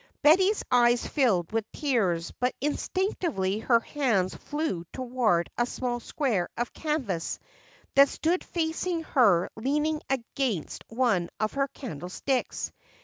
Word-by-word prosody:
Betty's 375 +8 +5
eyes 240 -1 +4
filled 210 - +1
with 220 -1 -2
tears, 195 - 0
but 250 +1 0
instinctively 295 - -1
her 235 +1 +4
hands 225 -10 0
flew 295 - -3
toward 240 -9 0
a 240 - +2
small 245 -1 -2
square 235 - -1
of 240 +1 -2
canvas 265 - -2 0.6
that 275 0 +7
stood 345 +3 0
facing 330 +1 -2
her 205 - +3
leaning 300 +6 0
against 255 - -2
one 225 -8 +1
of 215 0 0
her 275 0 +1
candlesticks. 240 - -3
250 Hz, 120 wpm, -27 LUFS, 205-295 Hz, 0.6 s, that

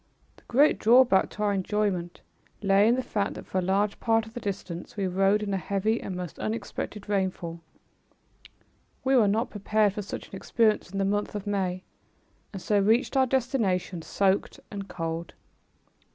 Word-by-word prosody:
The - - -20
great 280 +5 +4
drawback 235 -3 +5
to 210 - -5
our 205 -1 +2
enjoyment 190 -3 -1 0.4
lay 200 +1 +5
in 235 - +4
the 260 - -1
fact 205 -4 -2
that - - -8
for 190 - -1
a - - 0
large 195 +3 0
part 225 -1 +2
of 220 - -13
the 240 - -5
distance 195 -4 -6
we 200 - 0
rode 195 +3 +2
in 200 -1 -2
a - - +1
heavy 200 +4 -1
and 185 - -5
most 180 -2 -6
unexpected 215 -1 -4
rainfall. 185 -4 -2 1.4
We 265 0 +3
were 230 -5 +5
not 220 +5 0
prepared 210 0 +1
for 210 - -4
such 195 - -7
an - - -9
experience 215 +1 +1
in 195 - -5
the 195 - +1
month 205 +1 -1
of 205 -1 -4
May, 190 -3 -1 0.7
and 195 - -6
so 205 +2 +1
reached 225 +8 +2
our 265 -1 +4
destination 225 - 0
soaked 195 +3 0
and 200 -1 -6
cold. 165 -1 -5
200 Hz, 180 wpm, -27 LUFS, 190-220 Hz, 1.4 s, drawback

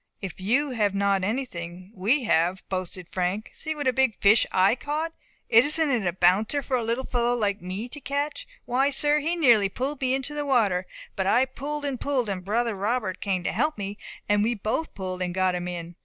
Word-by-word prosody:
"If 185 -2 -7
you 260 +9 +1
have 210 -5 0
not 200 -1 +1
anything, 185 -5 -4
we 230 +9 +1
have," 180 -2 +1
boasted 185 -1 -4
Frank. 185 +3 -2
"See 315 0 -4
what 290 -2 -4
a 255 - +3
big 260 -4 +1
fish 210 +3 +5
I 190 +3 +4
caught! 305 +5 -3 0.3
Isn't 290 +6 +4
it 225 -7 0
a - - +2
bouncer 190 +10 +2
for 260 - -1
a 250 - +1
little 230 +3 -1
fellow 240 0 +1
like 205 -4 -1
me 185 +6 -5
to 295 +3 -8
catch? 285 +3 -3 0.2
Why, 265 +3 +2
sir, 295 +2 +3
he 325 +4 -1
nearly 235 - +4
pulled 270 +7 -3
me 260 0 +2
into 270 +2 -4
the 295 0 -2
water; 210 -10 +1 0.3
but 190 -1 -1
I 245 +6 +4
pulled 290 +3 -5
and 270 -4 -3
pulled, 260 -6 0
and 185 -2 -3
brother 230 +4 0
Robert 205 -1 -2
came 190 -3 -1
to - - -1
help 300 +7 0
me, 200 0 -5 0.3
and 205 0 +3
we 235 +3 +1
both 220 +10 -3
pulled, 185 -2 -4
and 180 -1 -2
got 185 -1 +2
him 180 0 -3
in. 175 -1 -6
220 Hz, 215 wpm, -26 LUFS, 190-270 Hz, 0.3 s, fish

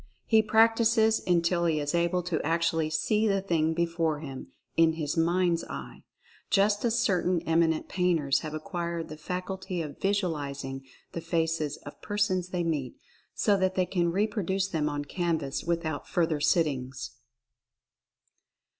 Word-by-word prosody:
He 220 -1 +5
practices 225 0 +4
until 170 0 +2
he 160 -2 +2
is 145 +1 -2
able 170 +1 +1
to 175 -2 -1
actually 165 0 +1
see 210 +8 +1
the 195 -1 +2
thing 160 -4 0
before 165 -2 0
him 135 -4 -7 0.3
"in 165 -1 +4
his 155 -3 -3
mind's 170 +1 +2
eye" - - -8 0.5
just 205 +1 +3
as 235 -1 +1
certain 185 -5 +2
eminent 160 -1 +1
painters 165 -7 +1
have 155 -1 -6
acquired 170 +1 -4
the 155 - -7
faculty 185 +2 -4
of 150 -3 -6
"visualizing" 145 -9 -2 0.3
the 170 - -5
faces 160 -3 -1
of 145 - -10
persons 205 -4 0
they 180 -1 -1
meet, 150 -7 -2 0.4
so 205 - +3
that 185 0 0
they 185 - +2
can 175 -2 0
reproduce 195 -1 0
them 155 -5 -1
on 145 0 -3
canvas 160 -4 -2
without 165 -3 -2
further 165 -3 0
sittings. 135 -5 0
170 Hz, 145 wpm, -28 LUFS, 155-190 Hz, 0.5 s, He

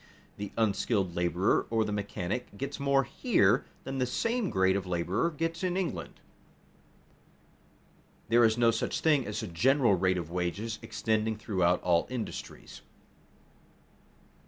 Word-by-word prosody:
_, - - -25 0.3
the 100 -1 -5
unskilled 100 -4 0
laborer 90 +2 +1
or 115 -1 +1
the 105 - -3
mechanic 100 +1 -4
gets 140 +4 -5
more 140 -1 +3
here 120 - +2 0.2
than 135 0 -4
the 125 - +1
same 230 - -1
grade 95 -1 +2
of 95 -2 -2
laborer 90 - 0
gets 165 +2 -3
in 180 0 0
England. 95 - -4 2.1
There 120 +1 +5
is 110 0 +4
no 115 -1 +4
such - - -2
thing 150 -7 +3
as 105 - -3
a - - -4
general 120 - +3
rate 95 0 +2
of 85 -2 -5
wages 90 +6 -3
extending 110 -1 -1
throughout 90 -5 +1
all 85 -2 +2
industries. 125 -3 -7
110 Hz, 140 wpm, -29 LUFS, 95-135 Hz, 2.1 s, There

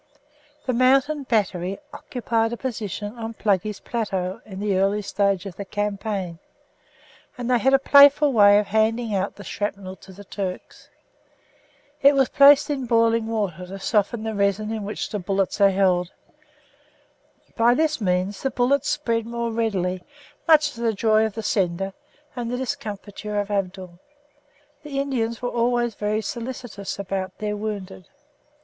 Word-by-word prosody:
The 255 - 0
mountain 270 +4 +3
battery 195 -4 0 0.2
occupied 230 -5 -2
a - - -4
position 215 -4 -5
on 225 0 -5
"Pluggey's 205 -1 0
Plateau" 195 -3 -3
in 190 -2 -8
the 205 -1 0
early 200 +2 +1
stage 200 -2 0
of 190 -3 -8
the 200 - -4
campaign, 200 -3 -3 1.0
and 245 -1 -4
they 250 -1 +3
had 265 +3 +4
a - - +6
playful 285 +1 +6
way 205 -2 +7
of 210 - +2
handing 220 +2 +1
out 195 0 -1
the 205 - -10
shrapnel 200 -1 -4
to 190 - -15
the 200 +2 -12
Turks. 190 -2 -6 1.1
It 280 +1 +6
was 270 -2 +3
placed 285 +1 +6
in 265 -3 -3
boiling 230 -1 +2
water 195 -6 -3
to 195 +2 -7
soften 215 +2 0
the 220 0 -3
resin 200 +1 0
in 220 -2 -4
which 210 - -4
the 210 - -2
bullets 195 +2 -1
are 200 - +7
held. 185 -2 +1 1.4
By 235 +1 +4
this 310 -2 0
means 185 +1 -1
the 270 - 0
bullets 260 +3 +1
spread 230 -6 -1
more 235 0 -3
readily, 190 -5 -1 0.5
much 305 -2 +5
to 235 - -9
the 230 -1 +1
joy 215 +1 +3
of 210 - -10
the 225 - -5
sender 195 -1 -1 0.4
and 240 -2 -4
the 245 - -2
discomfiture 210 -5 -4
of 205 0 -3
Abdul. 185 -3 -3 0.8
The 290 -2 -4
Indians 245 -4 -2
were 245 - 0
always 240 0 +1
very 210 +1 -1
solicitous 235 -3 -6
about 190 -1 -4
their 210 0 -3
wounded. 205 -3 -6
215 Hz, 155 wpm, -23 LUFS, 195-240 Hz, 1.4 s, way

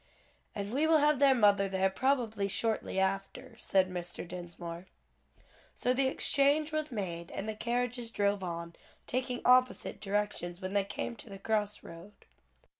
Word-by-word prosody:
"And 200 +1 -4
we 295 +4 +2
will 320 0 +6
have 295 -2 +3
their 275 -2 +6
mother 205 -4 +4
there 190 0 +1
probably 225 -4 0
shortly 220 -1 -1
after," 195 +1 -2
said 190 -1 +3
Mr. 175 0 -5
Dinsmore. 175 0 -7 0.9
So 250 - +1
the 265 +1 +2
exchange 285 +3 +2
was 310 -1 -2
made 170 -6 -4
and 200 - -5
the 220 - -2
carriages 240 +1 -2
drove 205 -2 0
on, 170 -1 -5 0.3
taking 250 0 -2
opposite 255 0 +3
directions 200 -4 -2
when 190 0 -5
they 200 -1 +2
came 235 - -4
to 220 - -10
the 195 - -8
cross 210 0 -1
road. 170 +5 -11
205 Hz, 155 wpm, -31 LUFS, 190-250 Hz, 0.9 s, will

